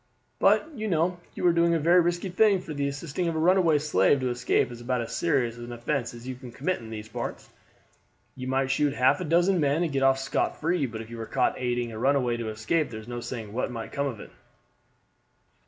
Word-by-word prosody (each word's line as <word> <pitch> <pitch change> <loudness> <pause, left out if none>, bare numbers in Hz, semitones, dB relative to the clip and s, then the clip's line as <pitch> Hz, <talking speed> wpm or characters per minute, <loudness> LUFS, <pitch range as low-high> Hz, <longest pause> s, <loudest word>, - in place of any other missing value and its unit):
But, - - +4
you 220 -5 -4
know, 175 0 +1 0.2
you - - -3
are 175 - +5
doing 170 0 +3
a - - +1
very 170 +4 +5
risky 175 +2 -1
thing; 200 +1 +4
for 165 -3 -7
the 140 -1 -1
assisting 145 +5 -3
of 165 - -1
a - - -1
runaway 170 -1 +4
slave 140 -4 +3
to 130 -1 0
escape 120 0 +1
is 120 0 -9
about 125 0 -1
as 115 - -5
serious 130 -9 +1
an 120 0 -8
offense 120 0 -2
as 120 +1 -10
you 130 - -3
can 125 -1 -11
commit 155 +9 -2
in 115 -2 -10
these 110 -1 -7
parts. 110 - -6 0.9
You 130 0 -6
might 135 0 +1
shoot 145 +1 +1
half 130 +4 +3
a - - -2
dozen 175 +4 +3
men 145 +2 +2
and 165 - -1
get 135 - 0
off 135 0 +4
scot 135 - -1
free, 165 -3 +1
but 110 -1 -6
if 115 +1 -11
you 115 - -7
were 110 -1 -6
caught 130 -2 +1
aiding 120 -1 -1
a 110 - -7
runaway 130 -2 +2
to 115 -2 -4
escape 110 +9 0
there 110 - -7
is 110 - -12
no 120 0 -5
saying 115 -4 -6
what 125 - -1
might 115 -2 -6
come 140 0 -1
of 120 -6 -5
it." - - -11
135 Hz, 240 wpm, -27 LUFS, 120-165 Hz, 0.9 s, are